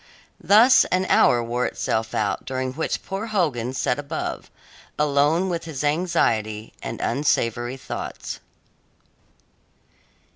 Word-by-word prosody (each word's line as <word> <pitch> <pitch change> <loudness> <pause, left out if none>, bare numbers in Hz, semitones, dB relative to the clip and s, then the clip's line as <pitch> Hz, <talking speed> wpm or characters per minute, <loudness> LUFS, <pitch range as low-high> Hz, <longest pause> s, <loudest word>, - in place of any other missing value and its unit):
Thus 225 +6 +7
an 185 +1 0
hour 120 -1 +4
wore 120 +2 -1
itself 110 0 -2
out 105 -2 -1
during 130 -1 -3
which 160 +4 -2
poor 195 +4 -4
Hogan 150 - 0
sat 130 0 -1
above, 145 -1 -5 0.5
alone 150 +4 +2
with 170 -2 -3
his 150 -4 -5
anxiety 115 -10 0
and - - -5
unsavoury 120 -3 0
thoughts. - - -6
140 Hz, 110 wpm, -23 LUFS, 120-170 Hz, 0.5 s, Thus